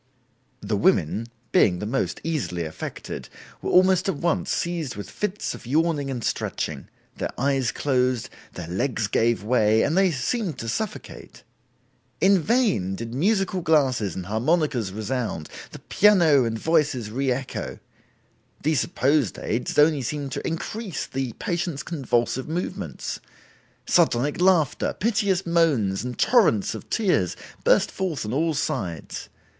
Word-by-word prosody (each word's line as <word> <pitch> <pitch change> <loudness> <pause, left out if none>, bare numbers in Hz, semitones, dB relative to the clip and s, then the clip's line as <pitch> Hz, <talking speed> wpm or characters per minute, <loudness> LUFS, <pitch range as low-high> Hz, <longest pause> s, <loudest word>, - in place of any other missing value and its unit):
The - - -1
women, 105 +9 +2 0.2
being 90 -3 +4
the 105 - -4
most 130 +6 -1
easily 130 - -2
affected, 80 - -7 0.3
were - - -3
almost 185 +1 +4
at - - 0
once 165 +3 0
seized 170 -6 -2
with 100 -2 -6
fits 210 0 -3
of - - -11
yawning 150 0 +1
and 125 -4 -4
stretching; - - -3 0.3
their - - -2
eyes 135 -2 +1
closed, 130 -4 0 0.3
their 85 -2 -7
legs 110 +5 -1
gave 115 +1 +1
way 110 -1 +3
and 155 - +1
they 190 0 +4
seemed 170 - -2
to 115 - -6
suffocate. 210 - -5 0.8
In 195 0 +5
vain 200 - +1
did 115 +2 -6
musical 190 - +1
glasses 130 - +2
and 95 - -5
harmonicas 125 - +1
resound, 110 -4 -3 0.2
the - - -10
piano 170 -10 +4
and 115 -1 -2
voices 145 -6 +1
re 135 +3 0
echo; 130 +1 -4 0.9
these 155 -2 +2
supposed 140 -3 +1
aids 115 +3 -2
only 150 -1 +5
seemed 145 0 -3
to - - -3
increase 185 - -4
the 130 -3 -3
patients' 170 - -3
convulsive 130 -4 -1
movements. 175 +3 -4 0.7
Sardonic 140 +8 +2
laughter, 180 -6 +3
piteous 200 -4 +1
moans 150 - +2
and 125 0 -5
torrents 200 - +3
of - - -9
tears 180 - +1 0.3
burst - - +4
forth 180 - -3
on 105 - -3
all 160 +3 +1
sides. 85 - -3
140 Hz, 140 wpm, -24 LUFS, 115-170 Hz, 0.9 s, In